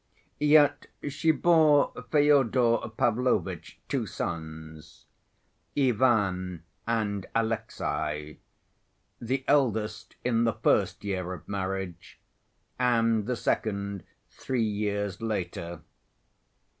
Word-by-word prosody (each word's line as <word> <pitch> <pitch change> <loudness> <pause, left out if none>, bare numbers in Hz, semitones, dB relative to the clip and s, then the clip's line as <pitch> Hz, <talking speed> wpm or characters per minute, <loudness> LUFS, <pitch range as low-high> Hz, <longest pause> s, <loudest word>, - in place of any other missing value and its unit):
Yet 150 -1 +4 0.2
she 160 +3 0
bore 155 -3 +4 0.2
Fyodor 130 -6 +3
Pavlovitch 125 +2 0
two - - -1
sons, 80 -1 -7 0.7
Ivan 105 - +2 0.2
and 105 -4 -1
Alexey, 110 -9 -2 0.8
the 130 +3 -2
eldest 110 -6 +1
in 115 -2 +2
the 115 -1 +2
first - - +1
year 95 -3 -3
of 90 - -10
marriage 95 -3 -4 0.6
and 115 -3 +2
the 125 - 0
second 100 -3 -2 0.3
three 125 -3 -2
years 105 -1 -2
later. 90 -6 -4
110 Hz, 85 wpm, -28 LUFS, 95-125 Hz, 0.8 s, Yet